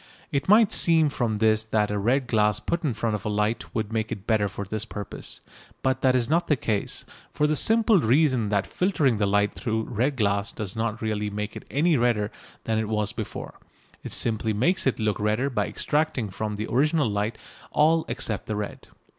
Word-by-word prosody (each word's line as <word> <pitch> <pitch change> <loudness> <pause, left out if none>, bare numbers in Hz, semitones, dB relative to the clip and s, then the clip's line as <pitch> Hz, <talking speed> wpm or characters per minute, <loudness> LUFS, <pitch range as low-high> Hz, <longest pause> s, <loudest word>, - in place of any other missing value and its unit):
It 140 +4 -1
might 215 0 +6
seem 160 -3 +4
from 120 -6 -1
this 110 0 +3
that 110 -1 0
a 105 - -1
red 125 +6 +1
glass 105 -3 +2
put 170 0 -2
in 135 -7 0
front 115 0 -1
of 105 -2 -3
a - - -2
light 105 +2 0
would 110 -1 -2
make 110 -1 -1
it 100 -1 -5
better 105 -3 +2
for 100 +1 -6
this 110 +2 -3
purpose, 105 -3 -7 0.4
but 130 0 +1
that 130 -1 +3
is 120 -2 +2
not 170 +3 +1
the 150 - +3
case, 110 -5 -2 0.3
for 150 - +1
the 155 0 +2
simple 220 +2 +4
reason 130 -3 +2
that 100 -1 +1
filtering 155 - +1
the 100 - +2
light 100 +1 +2
through 110 -3 -2
red 125 +5 -1
glass 100 -3 0
does 100 -3 -5
not 110 0 -2
really 105 -1 -1
make 105 +1 -5
it - - -8
any 155 +3 +2
redder 115 -3 +1 0.3
than 110 -1 0
it 110 -1 -2
was 105 -1 +1
before: 110 - -7 0.4
it - - -6
simply 110 -1 0
makes 175 - +1
it 130 - 0
look 110 -2 0
redder 110 +6 0
by 120 - 0
extracting 145 -8 -1
from 105 +2 -3
the 105 +1 -3
original 150 +4 +2
light 105 +2 -2 0.3
all 160 +2 +3
except 115 -4 -3
the 110 - -2
red. 105 -1 -5
110 Hz, 205 wpm, -25 LUFS, 105-140 Hz, 0.4 s, might